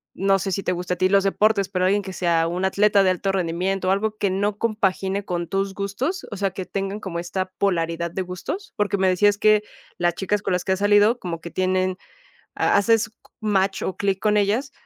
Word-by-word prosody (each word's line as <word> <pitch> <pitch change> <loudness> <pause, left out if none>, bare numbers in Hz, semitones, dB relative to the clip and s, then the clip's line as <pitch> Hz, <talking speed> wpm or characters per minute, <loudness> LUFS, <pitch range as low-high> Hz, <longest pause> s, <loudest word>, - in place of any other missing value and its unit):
no 195 0 +2
sé 195 +1 -3
si 195 +2 -2
te - - 0
gustan 180 0 -3
a - - -19
ti 185 - +3
los 200 0 +4
deportes, 200 0 +2
pero 185 -1 0
¿alguien 200 +2 +2
que 190 0 -7
sea 170 -3 +1
un 180 +3 -2
atleta 200 +1 +3
de 190 - +3
alto 190 +2 -1
rendimiento 185 +1 -1
o - - +4
algo 215 +2 0
que 200 - 0
no 200 +2 -1
compagine 200 -3 -1
con 175 -2 -3
tus 195 +1 -1
gustos? 240 - -3
O 205 - -5
sea, 195 0 0
¿que 185 0 -6
tengan 195 +2 -3
como 185 -5 -5
esta 185 +2 -3
polaridad 170 -3 0
de 190 - -3
gustos? 185 - -6
Porque 205 -1 +1
me 190 -1 +2
decías 205 +3 +3
que, 215 0 +4 0.3
las 175 -1 +1
chicas 200 +2 -1
con 190 - -1
las 180 0 0
que - - -2
has 190 - -3
salido 205 +3 +4
como 170 -5 -5
que 170 - -8
tienen 185 0 0 0.6
ha - - +2
haces 215 +1 +2 0.3
match 195 -2 +1
o 190 - -3
clic 195 -1 0
con 210 0 +2
ellas 210 +7 +1
195 Hz, 225 wpm, -23 LUFS, 185-205 Hz, 0.6 s, los